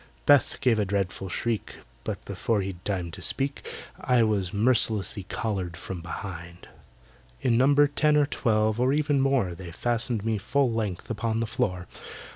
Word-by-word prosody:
BETH 145 Hz, -2 st, +5 dB
gave 115 Hz, -4 st, +3 dB
a -, -, +3 dB
dreadful 95 Hz, -1 st, -2 dB
shriek— 115 Hz, +4 st, -2 dB, 0.3 s
But -, -, -5 dB
before 110 Hz, -3 st, -1 dB
he'd 95 Hz, -2 st, -6 dB
time 90 Hz, -4 st, -2 dB
to -, -, -9 dB
speak 140 Hz, +1 st, -1 dB, 0.3 s
I 125 Hz, -2 st, +3 dB
was 100 Hz, -5 st, 0 dB
mercilessly 105 Hz, -3 st, +1 dB
collared 95 Hz, -7 st, -3 dB
from 90 Hz, 0 st, -6 dB
behind. 85 Hz, 0 st, -7 dB, 0.8 s
In 120 Hz, -3 st, +3 dB
number 140 Hz, +4 st, +5 dB
ten 150 Hz, +1 st, +2 dB
or 145 Hz, -, +4 dB
twelve, 110 Hz, -5 st, +1 dB
or 130 Hz, +2 st, +3 dB
even 145 Hz, -2 st, +2 dB
more, 135 Hz, -10 st, +2 dB
They 90 Hz, 0 st, -9 dB
fastened 120 Hz, +2 st, -1 dB
me 110 Hz, -2 st, 0 dB
full 135 Hz, +5 st, +1 dB
length 110 Hz, -3 st, -3 dB
upon 115 Hz, +1 st, -1 dB
the 115 Hz, -, 0 dB
floor. 110 Hz, -6 st, -2 dB
110 Hz, 160 wpm, -27 LUFS, 95-125 Hz, 0.8 s, BETH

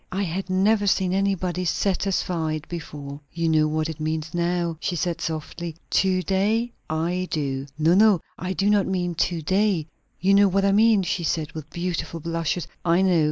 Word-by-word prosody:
I 195 Hz, +2 st, -1 dB
had 190 Hz, +1 st, -3 dB
never 205 Hz, +3 st, +2 dB
seen 190 Hz, -2 st, +2 dB
anybody 190 Hz, -2 st, 0 dB
'satisfied' 170 Hz, -3 st, -1 dB
before." 145 Hz, -4 st, -7 dB
"You 165 Hz, 0 st, -1 dB
know 155 Hz, -1 st, +3 dB
what 155 Hz, +1 st, -1 dB
it 160 Hz, -1 st, -6 dB
means 155 Hz, +1 st, -3 dB
now?" 170 Hz, -1 st, 0 dB
she 180 Hz, -, -2 dB
said 170 Hz, +1 st, -2 dB
softly. 160 Hz, +1 st, -4 dB, 0.2 s
"To 185 Hz, -1 st, +2 dB
day? 215 Hz, +6 st, +1 dB, 0.2 s
I 170 Hz, +4 st, -1 dB
do!" 135 Hz, -3 st, -2 dB
"No, 160 Hz, +2 st, +3 dB
no; 205 Hz, -1 st, +5 dB, 0.2 s
I 185 Hz, +1 st, -3 dB
do 195 Hz, +1 st, 0 dB
not 205 Hz, -2 st, +3 dB
mean 180 Hz, -2 st, -1 dB
to 165 Hz, 0 st, -1 dB
day. 190 Hz, -1 st, +1 dB, 0.3 s
You 195 Hz, +2 st, +3 dB
know 200 Hz, 0 st, +6 dB
what 195 Hz, +1 st, +1 dB
I 200 Hz, -, +4 dB
mean!" 215 Hz, 0 st, +4 dB
she 175 Hz, -1 st, -2 dB
said, 155 Hz, -1 st, -1 dB
with 155 Hz, -1 st, -8 dB
beautiful 170 Hz, -2 st, -3 dB
blushes. 165 Hz, +1 st, -2 dB, 0.2 s
"I 175 Hz, +2 st, +3 dB
know. 180 Hz, -3 st, +4 dB
175 Hz, 180 wpm, -24 LUFS, 160-190 Hz, 0.3 s, know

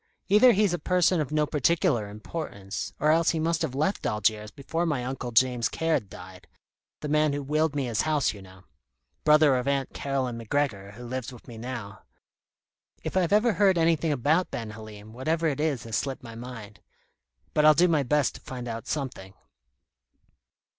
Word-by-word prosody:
Either 215 Hz, +6 st, +7 dB
he's 200 Hz, -2 st, +2 dB
a 175 Hz, -, -1 dB
person 180 Hz, -2 st, +2 dB
of 150 Hz, -, -4 dB
no 150 Hz, 0 st, +2 dB
particular 150 Hz, -, +1 dB
importance, 100 Hz, -4 st, -6 dB
or 150 Hz, +2 st, +3 dB
else 165 Hz, +1 st, +3 dB
he 165 Hz, -, 0 dB
must 165 Hz, +1 st, 0 dB
have 150 Hz, -6 st, -2 dB
left 155 Hz, +8 st, 0 dB
Algiers 105 Hz, 0 st, 0 dB
before 150 Hz, +6 st, -3 dB
my 145 Hz, -7 st, -1 dB
Uncle 130 Hz, -1 st, -4 dB
James 120 Hz, 0 st, +3 dB
Caird 160 Hz, -11 st, -1 dB
died 90 Hz, -1 st, -12 dB, 0.5 s
the 150 Hz, -, -4 dB
man 150 Hz, 0 st, +2 dB
who 145 Hz, 0 st, -3 dB
willed 155 Hz, +1 st, 0 dB
me 140 Hz, -2 st, 0 dB
his 115 Hz, -3 st, 0 dB
house, 150 Hz, -6 st, +1 dB
you 100 Hz, -, -11 dB
know 95 Hz, 0 st, -15 dB, 0.6 s
brother 150 Hz, -2 st, +5 dB
of 125 Hz, +1 st, -2 dB
Aunt 140 Hz, -1 st, -1 dB
Caroline 130 Hz, -4 st, -2 dB
MacGregor 110 Hz, -5 st, -2 dB
who 120 Hz, +4 st, -11 dB
lives 130 Hz, 0 st, -4 dB
with 125 Hz, -, -14 dB
me 115 Hz, -2 st, -9 dB
now. 120 Hz, -4 st, -7 dB, 1.0 s
If -, -, -5 dB
I've 180 Hz, -3 st, +2 dB
ever 215 Hz, +2 st, +4 dB
heard 195 Hz, -3 st, +3 dB
anything 165 Hz, -1 st, +2 dB
about 150 Hz, +6 st, +1 dB
Ben 115 Hz, -2 st, -5 dB
Halim, 110 Hz, 0 st, -11 dB
whatever 155 Hz, +7 st, -1 dB
it 145 Hz, -3 st, 0 dB
is 150 Hz, -6 st, 0 dB
has 115 Hz, -1 st, -2 dB
slipped 135 Hz, -2 st, -3 dB
my 115 Hz, -2 st, -9 dB
mind. 115 Hz, -3 st, -9 dB, 0.7 s
But 150 Hz, -, +3 dB
I'll 155 Hz, 0 st, +7 dB
do 175 Hz, +3 st, +5 dB
my 160 Hz, -4 st, +2 dB
best 145 Hz, +2 st, +1 dB
to -, -, -12 dB
find 125 Hz, -2 st, -7 dB
out 115 Hz, +1 st, -6 dB
something." 125 Hz, -10 st, -5 dB
135 Hz, 185 wpm, -27 LUFS, 115-160 Hz, 1.0 s, Either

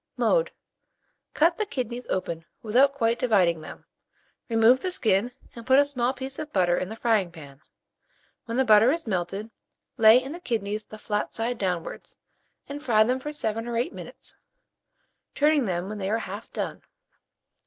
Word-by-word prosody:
Mode. -, -, +2 dB, 0.9 s
Cut 335 Hz, +4 st, +3 dB
the 430 Hz, -, +1 dB
kidneys 245 Hz, -, -4 dB
open 170 Hz, -3 st, -3 dB, 0.2 s
without 250 Hz, +6 st, +4 dB
quite 230 Hz, -3 st, +1 dB
dividing 185 Hz, -, +2 dB
them, -, -, -11 dB, 0.6 s
remove 230 Hz, +3 st, +4 dB
the 370 Hz, -, -2 dB
skin, 225 Hz, -, +1 dB, 0.2 s
and 235 Hz, -, -9 dB
put 260 Hz, +2 st, +4 dB
a 285 Hz, -, +6 dB
small 255 Hz, -3 st, 0 dB
piece 265 Hz, 0 st, -6 dB
of 310 Hz, -1 st, -6 dB
butter 180 Hz, -2 st, +2 dB
in 185 Hz, -, -3 dB
the 220 Hz, -, -6 dB
frying 220 Hz, -6 st, +1 dB
pan. 145 Hz, -4 st, -13 dB, 0.8 s
When 230 Hz, 0 st, -4 dB
the 265 Hz, -, +3 dB
butter 215 Hz, +1 st, +6 dB
is 330 Hz, +2 st, -2 dB
melted, 195 Hz, +2 st, -3 dB, 0.5 s
lay 220 Hz, 0 st, +8 dB
in 265 Hz, +2 st, -7 dB
the 340 Hz, -, -7 dB
kidneys 215 Hz, -, -3 dB
the 215 Hz, -, -11 dB
flat 210 Hz, -1 st, -3 dB
side 230 Hz, +1 st, -2 dB
downwards, 180 Hz, -4 st, -4 dB, 0.5 s
and 285 Hz, +1 st, -7 dB
fry 225 Hz, -7 st, +4 dB
them 250 Hz, +3 st, 0 dB
for 295 Hz, +3 st, -5 dB
7 225 Hz, -6 st, -3 dB
or 235 Hz, -1 st, -2 dB
8 245 Hz, +9 st, -1 dB
minutes, -, -, -9 dB, 1.0 s
turning 295 Hz, -2 st, +3 dB
them 180 Hz, -2 st, -2 dB
when 210 Hz, +1 st, -6 dB
they 190 Hz, 0 st, -2 dB
are 220 Hz, -, +1 dB
half 210 Hz, 0 st, -7 dB
done. -, -, -4 dB
225 Hz, 175 wpm, -26 LUFS, 200-260 Hz, 1.0 s, lay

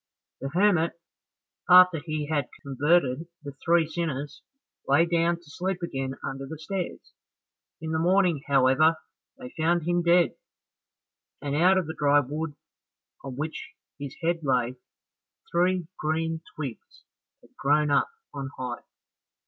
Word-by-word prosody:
The 135 Hz, -, -4 dB
hermit, 175 Hz, 0 st, +3 dB, 0.8 s
after 180 Hz, -2 st, +8 dB
he 155 Hz, -1 st, -3 dB
had 145 Hz, -3 st, -1 dB
converted 145 Hz, +1 st, +1 dB, 0.2 s
the 140 Hz, -1 st, -8 dB
three 170 Hz, -1 st, +3 dB
sinners, 150 Hz, -3 st, -4 dB, 0.5 s
lay 165 Hz, -, +5 dB
down 170 Hz, 0 st, +2 dB
to 170 Hz, -, -16 dB
sleep 180 Hz, +4 st, -4 dB
again 135 Hz, -5 st, -3 dB
under 135 Hz, 0 st, -5 dB
the 160 Hz, -, -7 dB
stairs. 180 Hz, +3 st, -5 dB, 0.7 s
In 160 Hz, 0 st, -4 dB
the 160 Hz, -, 0 dB
morning, 175 Hz, -3 st, +3 dB
however, 140 Hz, +4 st, +4 dB, 0.4 s
they 255 Hz, -1 st, -9 dB
found 170 Hz, +1 st, +1 dB
him 175 Hz, +2 st, +1 dB
dead, 175 Hz, 0 st, +4 dB, 1.1 s
and 145 Hz, 0 st, -3 dB
out 180 Hz, +5 st, +5 dB
of 185 Hz, -, +1 dB
the 160 Hz, -, -5 dB
dry 145 Hz, -1 st, +4 dB
wood 150 Hz, +3 st, -4 dB, 0.7 s
on 135 Hz, -2 st, -6 dB
which 155 Hz, +4 st, -5 dB, 0.3 s
his 140 Hz, -2 st, -6 dB
head 170 Hz, +1 st, +1 dB
lay, 125 Hz, -4 st, +1 dB, 0.8 s
three 180 Hz, 0 st, +2 dB
green 160 Hz, +1 st, -1 dB
twigs 135 Hz, -7 st, -7 dB, 0.4 s
had -, -, -23 dB
grown 150 Hz, +1 st, +2 dB
up 140 Hz, -, +3 dB, 0.2 s
on 135 Hz, -1 st, -5 dB
high. 125 Hz, -2 st, -4 dB
160 Hz, 135 wpm, -27 LUFS, 140-170 Hz, 1.1 s, after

